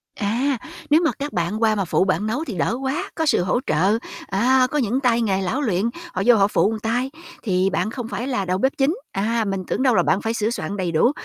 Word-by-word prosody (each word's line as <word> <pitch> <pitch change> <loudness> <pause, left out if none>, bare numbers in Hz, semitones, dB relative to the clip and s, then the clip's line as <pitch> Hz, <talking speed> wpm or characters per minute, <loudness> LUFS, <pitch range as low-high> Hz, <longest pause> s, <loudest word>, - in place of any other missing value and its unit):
À, 245 +7 0 0.3
nếu 305 +3 +5
mà 315 - +3
các 290 +1 -4
bạn 175 +5 -1
qua 220 -1 +3
mà 195 -2 -1
phụ 175 - +2
bạn 190 +2 0
nấu 245 +8 -1
thì 245 - -5
đỡ 220 +8 0
quá, 290 +9 -2
có 320 - 0
sự 285 - +3
hỗ 185 +7 +1
trợ. 190 +8 +2 0.3
À, 255 +6 +3
có 300 - 0
những 250 -2 +1
tay 240 -3 +2
nghề 195 -4 +1
lão 225 +10 -1
luyện, 215 -4 0 0.2
họ - - -2
vô 245 0 +7
họ 200 -2 +4
phụ 205 - +2
một 220 - -4
tay 245 +5 -1 0.3
thì 190 -3 +1
bạn 195 +3 -1
không 245 -2 -5
phải 240 +2 -4
là 250 -8 -1
đầu 185 0 0
bếp 265 +7 +2
chính. 280 +5 +2 0.2
À, 225 +3 0
mình 195 -1 -2
tưởng - - -1
đâu 255 -4 +4
là - - +4
bạn 195 - +1
phải 225 0 -1
sửa 220 -1 0
soạn 205 -3 -4
đầy 180 -3 -1
đủ, 165 +10 +3
225 Hz, 260 wpm, -22 LUFS, 195-260 Hz, 0.3 s, vô